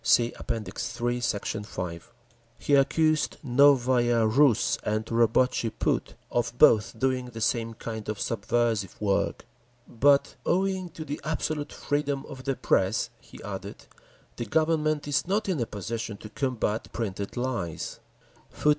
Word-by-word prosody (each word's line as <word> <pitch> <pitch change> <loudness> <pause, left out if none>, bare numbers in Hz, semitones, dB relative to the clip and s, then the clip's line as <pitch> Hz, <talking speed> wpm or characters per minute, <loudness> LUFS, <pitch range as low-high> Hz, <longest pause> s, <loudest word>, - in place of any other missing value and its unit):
(See 120 0 +4
App. - - -12
III, 120 +3 -2
Sect. 105 -4 -1
5) 90 -5 -6 0.5
He 145 - -1
accused 155 +3 +3
Novaya 125 -3 +4
Rus 115 -1 +3
and 110 +1 -1
Robotchi 115 +1 +2
Put - - 0 0.2
of 120 0 -1
both 110 -1 +5
doing 130 +1 0
the 115 -2 -8
same 115 0 0
kind 110 -1 -6
of 110 - -3
subversive 110 -3 -1
work. 100 -2 0 0.4
"But 140 +4 +3
owing 190 0 0
to 155 - -5
the 145 0 -5
absolute 155 0 -2
freedom 145 -1 -2
of 130 -3 -10
the 135 -1 0
press," 95 -2 +1
he - - -14
added, - - -7 0.5
"the 120 - -3
Government 155 -1 +1
is 145 +3 0
not 205 +3 0
in 180 -6 0
a 115 - -1
position 110 +1 -5
to 105 - -10
combat 115 -3 -2
printed 100 -1 -4
lies.…." 115 -10 -3
120 Hz, 135 wpm, -27 LUFS, 110-145 Hz, 0.5 s, both